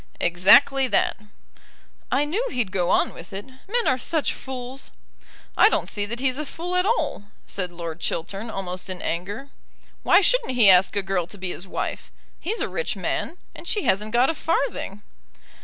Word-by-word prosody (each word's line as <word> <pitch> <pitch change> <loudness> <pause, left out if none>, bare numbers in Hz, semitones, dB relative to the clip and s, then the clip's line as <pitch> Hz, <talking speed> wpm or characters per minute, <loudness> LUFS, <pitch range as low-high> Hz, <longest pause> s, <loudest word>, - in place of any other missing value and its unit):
"Exactly 210 +10 +5
that." 215 - +2 1.0
"I 285 +2 +2
knew 415 +12 -1
he'd 240 -7 -1
go 180 -2 0
on - - +2
with 170 - -11
it. 195 +1 -5
Men 390 - -3
are 260 - +2
such 315 +4 0
fools." 260 0 -7 0.7
"I 415 - +7
don't - - 0
see 205 -1 -1
that 235 +3 -4
he's 260 +1 0
a 305 - -3
fool 355 +5 -4
at 360 +2 +3
all;" 435 - 0 0.2
said 185 -2 -4
Lord 170 -1 -6
Chiltern, 195 +7 -3
almost 185 -3 -4
in 185 -1 -3
anger. 205 +11 -4 0.5
"Why - - +6
shouldn't 460 - +2
he 215 -5 +7
ask 185 +2 +4
a 200 - 0
girl 190 -3 -1
to 205 - -9
be 185 -2 -3
his 180 - -6
wife? - - -4 0.3
He's 430 +7 -2
a - - 0
rich 485 - -2
man, 345 - -3 0.2
and - - -10
she 415 - +1
hasn't 210 +3 +1
got 245 +5 +4
a - - -5
farthing." 280 -11 -2
235 Hz, 185 wpm, -24 LUFS, 190-295 Hz, 1.0 s, I